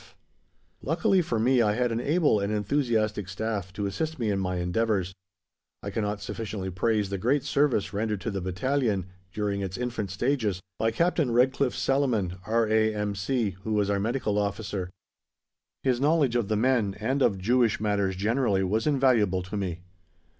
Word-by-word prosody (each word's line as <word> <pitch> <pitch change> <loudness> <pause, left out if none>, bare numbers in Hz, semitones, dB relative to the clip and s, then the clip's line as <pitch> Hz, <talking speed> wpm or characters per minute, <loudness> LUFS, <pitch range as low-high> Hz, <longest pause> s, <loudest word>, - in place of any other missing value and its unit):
E.F. - - -21 0.7
Luckily 195 -5 +2
for 120 -8 -2
me, 125 +3 +3
I 105 -2 +3
had 125 0 +1
an 115 - -1
able 145 -3 +2
and 100 +1 -1
enthusiastic 110 -3 0
staff 100 -2 -3
to 100 +2 -3
assist 160 +11 -3
me 115 -5 0
in 100 - 0
my 90 -1 -1
endeavours. 95 +1 0 0.7
I - - -4
cannot 105 -1 -2
sufficiently 105 -4 -4
praise 105 +2 0
the 100 - -2
great 130 +7 +1
service 140 -9 +1
rendered 105 0 -1
to 110 - -3
the 100 -1 -3
Battalion, 100 +2 0 0.3
during 100 -1 -2
its 95 -1 -4
infant 120 -5 -3
stages, 105 -1 0 0.2
by 110 - +2
Captain 160 +3 +1
Redcliffe 125 +2 +2
Salaman, 115 -10 0
R.A.M.C., 110 0 +1
who 110 - -2
was 100 -1 +1
our 100 - +1
medical 110 -1 0
officer. 100 -2 -3 0.9
His 130 -2 +1
knowledge 145 -4 +3
of 120 -4 +1
the 110 - 0
men 115 -4 +2
and 130 +6 0
of 100 -6 +3
Jewish 115 +4 +2
matters 100 -3 0
generally 105 0 +1
was 110 +7 0
invaluable 120 -10 +3
to 95 +4 -7
me. 90 -4 -3
110 Hz, 165 wpm, -27 LUFS, 100-125 Hz, 0.9 s, me